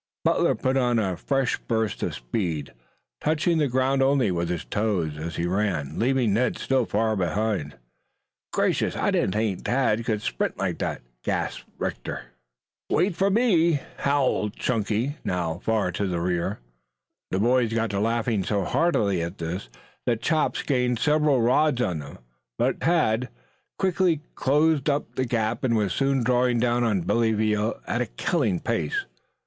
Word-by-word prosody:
Butler - - +3
put 130 +1 0
on 120 -2 +2
a 95 -5 0
fresh 135 +5 0
burst 110 -3 -1
of - - -2
speed, 75 - -3 0.5
touching 160 +2 +2
the 150 - +3
ground 130 +1 +1
only 135 -6 +3
with 85 -1 -1
his 90 -2 -3
toes, 100 -8 -1
as 85 +2 -5
he 85 - -1
ran, 90 -6 -1
leaving 125 -3 +2
Ned 125 +4 +1
still 130 -3 +1
farther 105 -4 +1
behind. 100 - -2 0.7
"Gracious, - - +1
I - - +1
didn't 95 - +1
think 105 -3 -1
Tad 120 -3 +1
could 110 -2 -1
sprint - - -2
like - - -2
that," - - -3 0.2
gasped - - -2
Rector. - - -4 0.7
"Wait 180 +2 +2
for 195 +3 +2
me," 175 - +3 0.2
howled 135 -7 +1
Chunky, 115 +4 -1
now 85 -2 -2
far 110 -5 0
to 100 +3 -2
the 90 -2 -1
rear. 90 +3 -1 0.7
The 95 - -1
boys 120 +2 +2
got 115 -1 0
to 100 - -1
laughing 115 -1 0
so 100 +1 0
heartily 100 - +1
at 85 +4 -4
this 85 -3 -4 0.4
that 120 -2 +2
Chops 155 +5 0
gained 125 -3 +1
several 150 -2 +3
rods 130 +2 +3
on 90 -10 0
them, 75 0 -9 0.4
but - - 0
Tad 125 -8 +2 0.5
quickly 185 -4 +2
closed 150 +1 +2
up 145 0 -1
the 130 - -1
gap 115 -1 -1
and 120 -3 +2
was 100 -4 0
soon 135 0 +1
drawing 125 0 +2
down 120 0 +2
on 105 -6 +1
Billy 115 +5 +2
Veal 105 0 0
at 120 - -1
a 125 - -1
killing 110 - 0
pace. 75 -4 -1
115 Hz, 160 wpm, -25 LUFS, 95-135 Hz, 0.7 s, Butler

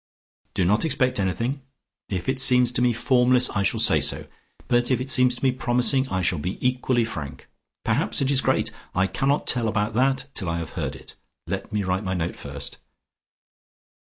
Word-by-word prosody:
Do 90 - +1
not 105 +5 +2
expect 130 -7 0
anything; 115 - -2 0.5
if 90 -3 -4
it 130 0 -1
seems 125 -2 +5
to 125 - -1
me 125 0 +3
formless, 125 +1 +3
I 100 - -1
shall 100 - 0
say - - +4
so. - - -1 0.4
But 120 0 +1
if 130 - +1
it 130 +1 -2
seems 125 -1 +4
to - - -10
me 130 - +3
promising, 125 +2 +3
I 95 -1 -2
shall 85 -2 0
be 90 +6 -4
equally 125 -1 0
frank. 75 -10 -8 0.4
Perhaps - - +2
it 135 0 +1
is 135 -1 +2
great; - - 0 0.2
I 95 +1 +2
cannot 135 +9 -1
tell 120 -3 +3
you - - +1
about 105 +1 -1
that 130 +2 +1
till 95 -5 -3
I 85 - -2
have 85 -1 -6
heard 75 -6 -4
it. 65 - -13 0.3
Let - - -5
me 105 -1 -1
write 95 +2 -2
my 95 -1 -3
note 85 -1 -3
first." - - -8
120 Hz, 200 wpm, -23 LUFS, 95-130 Hz, 0.5 s, seems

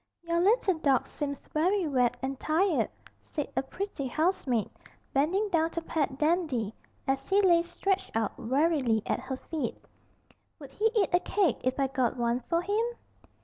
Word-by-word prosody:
'Your 335 0 0
little 390 -3 +3
dog 275 -5 +3
seems 285 -2 -4 0.2
very 360 +3 +2
wet 250 -3 +2
and 265 0 -3
tired,' 335 +3 +2 0.3
said 295 -3 -5
a - - +2
pretty 290 0 -4
housemaid, 265 - +1 0.5
bending 345 +10 +2
down 325 -3 +2
to 335 - -4
pat 290 -5 -1
Dandy, 300 - +1 0.3
as 270 0 -1
he 395 - +4
lay 350 -4 +5
stretched 380 +3 -1
out 225 -2 0
wearily 260 -4 +2
at - - 0
her 260 +1 -5
feet. 315 +2 -4 0.8
'Would 280 -4 -11
he 430 - -2
eat 405 -5 +2
a 355 - +6
cake 360 - +1
if 255 +2 0
I 275 - +3
got 260 -2 0
one 235 0 +1
for 335 +7 -1
him?' 420 +4 +1
310 Hz, 165 wpm, -29 LUFS, 265-355 Hz, 0.8 s, a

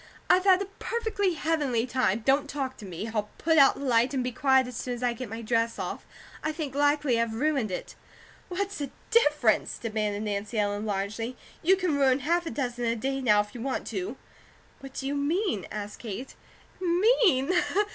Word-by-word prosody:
I've 370 +1 +4
had 375 -2 +6
a 395 - -12
perfectly 430 -6 -1
heavenly 295 -7 0
time. 240 -4 +1
Don't 280 +1 +3
talk 270 -3 -3
to 210 - -10
me. 190 +5 -5
I'll 210 -1 -1
put 320 -1 +3
out 275 - +7
the - - -9
light 245 +2 +3
and 255 - 0
be 250 - -2
quiet 265 +1 +3
as 250 -1 -8
soon 245 +1 -3
as 240 - -7
I 245 -1 +2
get 235 -1 -7
my 225 +2 -6
dress 230 0 0
off. - - -5 0.4
I 310 - 0
think 305 -4 -5
likely 290 -4 +2
I've 230 -1 -1
ruined 270 -3 +1
it." 180 - -5 0.6
"What's 400 +1 -3
the 285 -2 -3 0.2
difference?" 295 - +3
demanded 215 -2 -2
Nancy 210 +2 -3
Ellen, 205 0 0
largely. 215 +5 -3 0.2
"You 370 +4 +5
can 365 -6 0
ruin 270 -1 +3
half 340 +4 +1
a - - -1
dozen 245 -5 -3
a 230 0 +1
day 270 +4 -2
now, 210 -5 +5
if 205 - -9
you 240 - -7
want 265 +2 -2
to." 375 +1 -4 0.6
"What 270 -1 -11
do 270 - -4
you 275 - -1
mean?" 290 - 0
asked 210 -1 -6
Kate. 230 +3 -6 0.5
"'Mean?'" 365 - +3
260 Hz, 195 wpm, -27 LUFS, 225-310 Hz, 0.6 s, out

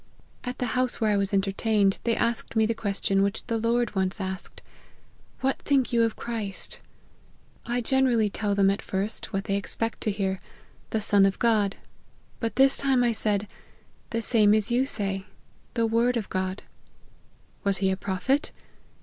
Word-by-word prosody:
At 250 -1 -4
the 250 - -1
house 255 0 0
where 220 -2 +2
I - - +3
was 200 0 0
entertained, 200 0 +1
they 230 -1 +2
asked 235 0 -1
me 220 0 +4
the 230 - +1
question 200 -3 0
which 200 +1 -1
the 230 -1 -1
Lord 235 0 +1
once 190 +1 -1
asked, 190 0 -5 0.4
' - - -32
What 270 +1 0
think 270 -4 +1
ye 235 - +3
of 225 -1 +1
Christ 220 -5 -4 0.4
?' - - -33
I 240 +1 0
generally 245 -3 +2
tell 205 0 -1
them 195 -1 +4
at 200 - -3
first, 195 +3 -3
what 195 -2 -2
they 200 -2 -1
expect 225 +3 -2
to 215 - 0
hear, 190 -2 -2
i - - -26 0.4
The 220 - -1
Son 205 -1 +5
of 195 -1 +2
God 215 -4 +2 0.3
;' - - -34
but 230 -1 -2
this 270 +1 +5
time 265 -3 +2
I 240 - +3
said, 210 -2 0 0.3
' - - -35
The 230 0 -2
same 215 -3 +5
as 215 +1 +1
you 255 +3 +2
say, 195 -5 -2 0.5
the 230 -1 +2
word 235 +2 +2
of 215 - -4
God.' 185 +1 -2 0.5
' - - -35
Was 200 -1 +1
he 190 0 +1
a - - +1
Prophet 200 +10 -1
215 Hz, 190 wpm, -26 LUFS, 195-235 Hz, 0.5 s, Son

